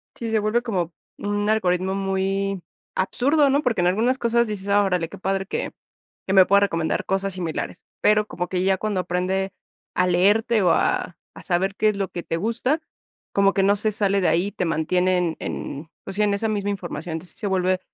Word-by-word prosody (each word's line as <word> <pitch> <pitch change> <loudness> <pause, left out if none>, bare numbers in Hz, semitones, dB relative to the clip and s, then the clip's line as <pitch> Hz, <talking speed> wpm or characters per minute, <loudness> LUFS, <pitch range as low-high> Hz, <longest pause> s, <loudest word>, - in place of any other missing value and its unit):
Sí, 230 -1 -4
se 220 - +3
vuelve 215 +3 +1
como 180 -8 -2 0.2
un 205 0 -1
algoritmo 185 -3 +1
muy 195 0 -1 0.3
absurdo, 280 +9 +2
¿no? 285 +2 +3
Porque 230 -9 +1
en 175 - +3
algunas 230 +8 +2
cosas 235 -1 +2
dices: 205 -2 -5
"Ah, 205 0 +4
órale, 180 -4 0
qué 200 - -10
padre 195 +1 -1
que - - -3 0.5
que 190 - 0
me 190 -2 +8
pueda 200 +1 +4
recomendar 165 -5 0
cosas 195 0 -1
similares". 170 -1 -4 0.2
Pero 210 0 +4
como 180 0 -4
que 185 -1 -1
ya 190 0 +3
cuando 205 -2 -1
aprende 185 +2 -1 0.4
a 180 0 +3
leerte 205 +5 +3
o 180 - +4
a 180 - +1 0.2
a - - -11
saber 190 +2 0
qué 215 - +3
es 205 - -2
lo 195 -1 -2
que 175 - -6
te 165 - -2
gusta, 235 - 0 0.5
como 200 0 +4
que 195 - +2
no 200 +1 +4
se 215 +1 0
sale 200 -1 +1
de - - +2
ahí, 185 +5 +1
te 185 -3 -2
mantiene 180 +3 +1
en 170 -2 0
en, 155 +4 -5
pues 195 - -7
sí, 210 - +2
en 205 -1 +2
esa 220 +2 0
misma 205 -1 -1
información. 175 -4 -5
Entonces, 170 +2 -6
se 205 - -2
vuelve 185 -1 +1
195 Hz, 210 wpm, -23 LUFS, 180-210 Hz, 0.5 s, me